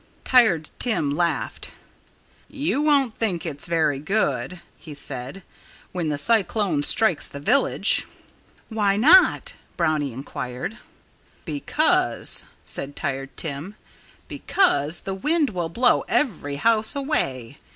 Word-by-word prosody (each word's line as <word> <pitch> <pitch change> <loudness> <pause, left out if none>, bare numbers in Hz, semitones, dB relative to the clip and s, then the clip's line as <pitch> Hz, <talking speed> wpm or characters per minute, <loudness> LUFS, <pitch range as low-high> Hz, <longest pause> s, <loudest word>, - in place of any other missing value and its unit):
Tired 220 -12 +3
Tim 215 - +1
laughed. 170 +3 -2 0.8
"You 285 0 -1
won't 280 -6 +2
think 185 -7 -2
it's 150 -2 -1
very 155 -4 +1
'good,'" 180 +1 -1 0.2
he 155 -3 -11
said, 135 +5 -4 0.5
"when 175 -4 -3
the 145 - -2
cyclone 200 -2 +1
strikes 185 +3 +3
the 140 - -8
village." 245 - +2 0.6
"Why 205 -3 +1
not?" 330 - +5 0.2
Brownie 150 -3 0
inquired. 125 - -6 0.7
"Because 315 +5 0
" - - -35
said 140 +1 -4
Tired 135 0 -5
Tim 160 +6 -5 0.5
"because 155 - +1
the 195 - -4
wind 300 - 0
will 175 -4 -3
blow 245 +8 +2
every 160 - -1
house 220 - +2
away. 140 - -2
180 Hz, 115 wpm, -23 LUFS, 145-235 Hz, 0.8 s, not